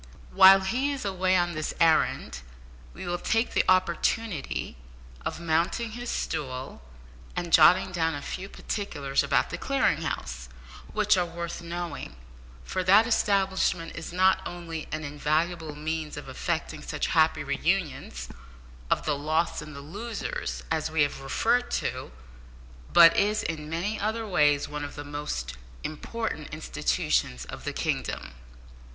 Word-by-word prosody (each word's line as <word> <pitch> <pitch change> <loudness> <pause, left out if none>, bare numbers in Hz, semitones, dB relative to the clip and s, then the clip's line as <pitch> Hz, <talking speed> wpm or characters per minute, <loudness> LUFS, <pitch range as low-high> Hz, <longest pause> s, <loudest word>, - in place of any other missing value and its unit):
While 195 +1 +9
he 255 +9 0
is 275 -6 -4
away 185 -1 +1
on 175 -1 +1
this 155 -1 -3
errand, 160 - +2 0.5
we - - -8
will 175 0 -2
take 225 +2 0
the - - +3
opportunity 185 - 0 0.5
of - - -3
mounting 170 +7 0
his 240 +2 -6
stool 130 - -4 0.5
and 170 -1 -3
jotting 180 +4 +7
down 165 -3 0
a 145 - -5
few 190 +1 -5
particulars 145 -13 -2
about - - +1
the - - -4
Clearing - - +1
House, 60 0 -4 0.4
which 210 -1 +3
are 180 - +2
worth 170 0 -5
knowing, 170 - -5 0.5
for 185 - -2
that 200 +5 +6
establishment 195 -6 +1
is 160 - -6
not 185 +2 +3
only 165 -3 -6
an 155 0 -3
invaluable 155 +2 -1
means 155 0 -3
of - - -7
effecting - - -3
such - - -3
happy - - +3
re - - -2
unions 60 0 -1 0.6
of - - +1
the 150 - +1
lost 155 +4 0
and 150 -1 -9
the 140 - -7
losers, 205 +9 -5
as 160 -1 0
we 160 -1 +3
have 145 -1 -2
referred 225 - +1
to, - - -3 0.8
but 165 -1 +8
is, 210 +1 +2
in 155 -2 -4
many 180 +7 -2
other 220 +2 -1
ways, 150 -6 +3
one 150 0 -5
of 145 - -6
the 145 - -6
most 75 - -4 0.3
important 155 +1 -4
institutions 60 - -1
in - - -8
the - - -4
kingdom. - - -2
165 Hz, 145 wpm, -27 LUFS, 150-190 Hz, 0.8 s, While